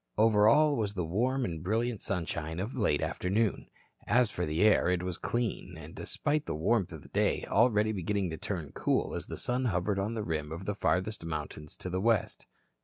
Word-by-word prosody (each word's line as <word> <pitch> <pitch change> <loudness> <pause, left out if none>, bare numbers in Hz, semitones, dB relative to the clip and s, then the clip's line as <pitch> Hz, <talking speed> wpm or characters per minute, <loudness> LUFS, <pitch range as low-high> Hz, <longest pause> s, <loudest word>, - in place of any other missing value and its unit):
Over 105 -1 +5
all 150 +5 +5
was 105 -2 -1
the 90 -3 -1
warm 125 +10 0
and 80 -3 -4
brilliant 110 +4 -1
sunshine 85 -3 -3
of 105 +6 -4
late 105 - +1
afternoon. 100 +3 0 0.4
As 120 0 +3
for 90 -4 -2
the 80 +5 +1
air, 105 -4 +5
it 90 -1 +1
was 90 -2 -4
clean 115 -6 -2
and 80 0 -10
despite 150 +1 -2
the - - -2
warmth 95 +4 +1
of 80 -3 -9
the - - -15
day - - +1
already 110 -1 +3
beginning 100 -2 -1
to 80 - -4
turn 85 -7 -4
cool - - 0
as - - -5
the - - -6
sun 125 +1 -1
hovered 100 -1 0
on 105 +4 -2
the 110 - -2
rim 80 -4 -3
of 85 +4 -6
the 105 - -1
farthest 100 0 0
mountains 75 -2 -6
to 90 - -6
the 95 +1 -1
west. 115 -1 +1
100 Hz, 205 wpm, -30 LUFS, 85-115 Hz, 0.4 s, Over